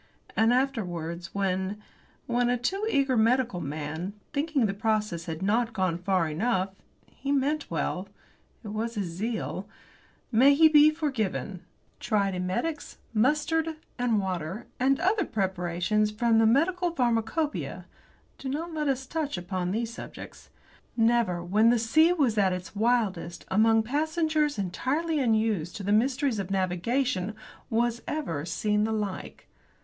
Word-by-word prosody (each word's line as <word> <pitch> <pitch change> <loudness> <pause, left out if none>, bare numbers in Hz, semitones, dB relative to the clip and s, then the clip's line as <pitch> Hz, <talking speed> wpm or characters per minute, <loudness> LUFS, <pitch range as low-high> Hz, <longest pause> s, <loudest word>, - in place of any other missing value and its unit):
And, 225 +1 +4
afterwards, 180 -10 -1
when 190 +1 -1 0.5
when 245 0 +1
a 245 - +2
too 390 - -1
eager 275 - +2
medical 230 -3 +2
man, 155 +5 -4 0.2
thinking 290 -3 +1
the 195 - 0
process 210 -5 -1
had 165 +1 -5
not 225 +3 +1
gone 185 -4 0
far 185 -2 +1
enough 190 +4 0 0.3
he 275 +1 -5
meant 285 +2 0
well; 180 +4 -2 0.5
it 215 - -7
was 225 +3 -3
his 205 -2 -1
zeal; 210 +7 -4 0.6
may 265 +5 +6
he 320 +2 +7
be 305 -1 +7
forgiven 225 - -2 0.4
tried 200 -3 +1
emetics, 185 - -3 0.2
mustard 305 +7 +1 0.2
and 240 -3 +2
water, 185 +2 -3
and 270 +2 +3
other 390 +2 +2
preparations 190 - 0
from 225 +1 +2
the 225 - +5
medical 350 +9 +2
pharmacop[oe]ia 250 +2 -1 0.5
do 265 - -5
not 325 +5 -3
let 305 -2 -1
us 265 -1 0
touch 300 - -3
upon 180 0 -3
these 230 +4 -2
subjects. - - -10 0.5
Never, 225 -6 +2
when 210 +6 +4
the 240 - +4
sea 310 +10 +4
was 265 -11 +2
at 190 -2 +3
its 180 +3 -6
wildest, 205 -6 0
among 225 +2 +4
passengers 310 +2 0
entirely 275 - -1
unused 220 - +1
to 205 - -6
the 200 - -1
mysteries 255 +2 +2
of 195 -2 -4
navigation, 195 +3 0 0.3
was 235 +1 0
ever 165 - -3
seen 210 +3 0
the 220 - 0
like. 210 -3 -4
225 Hz, 140 wpm, -27 LUFS, 190-275 Hz, 0.6 s, he